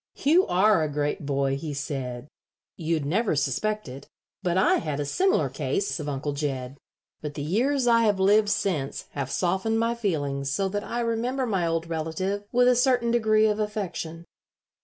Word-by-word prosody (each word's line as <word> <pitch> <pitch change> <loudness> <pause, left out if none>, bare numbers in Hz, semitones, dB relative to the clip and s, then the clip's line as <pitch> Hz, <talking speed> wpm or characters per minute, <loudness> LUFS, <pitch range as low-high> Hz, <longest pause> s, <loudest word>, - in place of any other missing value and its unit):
"You 330 +6 +4
are 195 0 +4
a 155 - 0
great 145 0 -2
boy," 135 -1 0
he 145 0 -5
said. 135 -2 -4 0.5
"You'd 160 -3 -1
never 195 +5 +1
suspect 180 +10 -1
it, 130 +2 -10 0.3
but 180 -2 0
I 190 - +4
had 150 -3 -3
a 145 - -1
similar 380 - +2
case 400 - -2
of 150 -1 -4
Uncle 145 +1 -2
Jed, 135 -2 -4 0.4
but 150 -1 -5
the 145 - -4
years 250 - +1
I 230 -1 +4
have 205 -3 +2
lived 205 +2 +4
since 165 -9 -1
have 140 -2 -4
softened 190 +8 0
my 230 +1 +1
feelings 145 -11 -2
so 195 +7 0
that 205 +1 -3
I 240 - -3
remember 240 +3 -1
my 190 -7 0
old 165 0 -1
relative 170 +5 -3
with 245 +1 +4
a 250 - +5
certain 245 -2 +2
degree 220 -2 +3
of 210 0 +1
affection." 185 -6 -4
185 Hz, 180 wpm, -26 LUFS, 145-220 Hz, 0.5 s, a